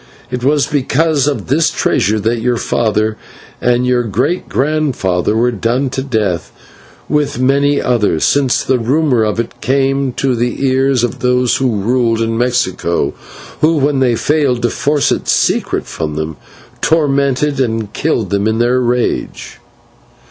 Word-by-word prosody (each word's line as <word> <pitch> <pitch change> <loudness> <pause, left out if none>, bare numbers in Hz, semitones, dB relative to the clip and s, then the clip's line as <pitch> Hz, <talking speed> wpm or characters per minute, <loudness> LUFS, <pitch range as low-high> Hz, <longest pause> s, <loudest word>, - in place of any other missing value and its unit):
It 125 -1 -4
was 145 +1 +2
because 150 +1 +1
of 145 - -2
this 155 +5 +2
treasure 110 +3 0
that 115 +2 0
your 120 0 0
father 110 -2 0 0.4
and 125 0 +2
your 125 -1 +2
great 120 - -1
grandfather 130 - 0
were 120 +2 +2
done 120 +4 -1
to 130 - -2
death 110 - -2 0.6
with 150 -5 0
many 140 +2 +2
others, 105 -10 +1
since 140 -3 +2
the 130 -1 +1
rumour 130 0 +1
of 105 +1 -1
it 115 - -5
came 135 0 +1
to 135 0 0
the 120 +3 -1
ears 130 -1 +2
of 120 - -2
those 125 -1 +1
that 135 - 0
ruled 115 +1 +1
in 115 0 -1
Mexico, 105 -8 0 0.5
who, 160 +1 +3
when 140 -1 +1
they 125 -3 +2
failed 135 -2 0
to 120 - +1
force 145 -1 +1
the - - 0
secret - - 0
from 75 -2 -4
them, 80 0 -4 0.5
tormented 140 -2 +1
and 115 -4 -1
killed 120 - -1
them 100 +1 +1
in 110 0 0
their 120 +2 +2
rage. 120 0 -2
125 Hz, 155 wpm, -15 LUFS, 115-140 Hz, 0.6 s, who